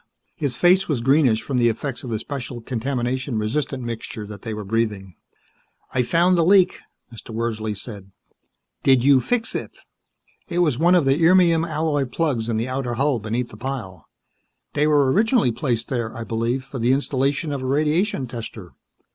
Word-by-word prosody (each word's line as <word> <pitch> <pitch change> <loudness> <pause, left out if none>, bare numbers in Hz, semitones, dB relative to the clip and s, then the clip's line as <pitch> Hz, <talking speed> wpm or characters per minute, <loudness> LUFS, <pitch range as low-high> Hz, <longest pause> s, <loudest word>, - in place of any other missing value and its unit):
His 140 -5 -2
face 180 +6 +4
was 145 -6 0
greenish 130 -2 +3
from 130 -3 -1
the 120 -1 +4
effects 125 +3 -4
of 125 - -6
the 110 - -1
special, 125 +1 -6
contamination 125 +1 -2
resistant 130 +4 -2
mixture 115 -2 -6
that 105 0 -10
they 115 - -5
were 105 -1 -5
breathing. 105 -3 -2 0.8
"I 130 - +2
found 170 +8 +3
the 170 - +3
leak," 185 +1 +4 0.3
Mr. 115 - -11
Wordsley 110 -2 -3
said. 100 -3 -8 0.7
"Did 130 -3 +4
you 140 0 +6
fix 230 - -1
it?" - - -5 0.7
"It 175 - -3
was 150 -8 +2
one 175 +3 +5
of 170 -5 +3
the 135 +4 +2
irmium 170 -1 +5
alloy 155 -3 0
plugs 125 -4 -1
in 115 - 0
the 115 +3 -1
outer 130 -2 -2
hull 135 0 +1
beneath 115 +3 -3
the - - -12
pile. 115 - -6 0.7
They 150 +1 +2
were 145 -3 +4
originally 220 - +3
placed 120 -1 -2
there, 120 -4 -3
I 115 - -4
believe, 115 +4 -1
for 135 -1 -7
the 120 +3 +3
installation 140 +2 0
of 140 -2 -3
a 130 - -3
radiation 150 - +1
tester. 115 -6 -8
130 Hz, 180 wpm, -22 LUFS, 115-150 Hz, 0.8 s, you